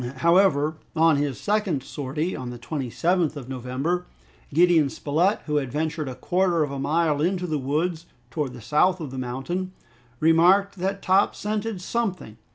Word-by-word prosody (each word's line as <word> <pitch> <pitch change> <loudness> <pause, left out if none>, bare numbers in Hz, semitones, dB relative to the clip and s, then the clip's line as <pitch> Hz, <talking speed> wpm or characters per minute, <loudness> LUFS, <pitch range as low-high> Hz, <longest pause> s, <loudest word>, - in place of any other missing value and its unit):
However, 160 -1 +3 0.2
on 160 -2 +4
his 140 -3 -2
second 200 - 0
sortie, 150 +7 -3
on 125 -1 -5
the 125 - -7
27th 155 +6 -1
of 135 -4 -8
November, 135 +8 -2 0.4
Gideon 165 -2 +4
Spilett, 165 +10 0
who 150 -1 0
had 135 -4 -2
ventured 155 0 -2
a 130 - -6
quarter 175 +4 +1
of 145 - -3
a 140 - -4
mile 150 +1 +1
into 180 +2 0
the 155 -4 -1
woods, 160 +5 -2 0.2
towards 145 -5 -2
the 120 - -10
south 150 - +2
of 150 -5 -6
the 130 - -5
mountain, 135 +10 -4 0.5
remarked 180 +5 +4
that 195 +2 -2
Top 190 +2 +3
scented 210 -1 -3
something. 185 - -3
160 Hz, 165 wpm, -24 LUFS, 140-180 Hz, 0.5 s, on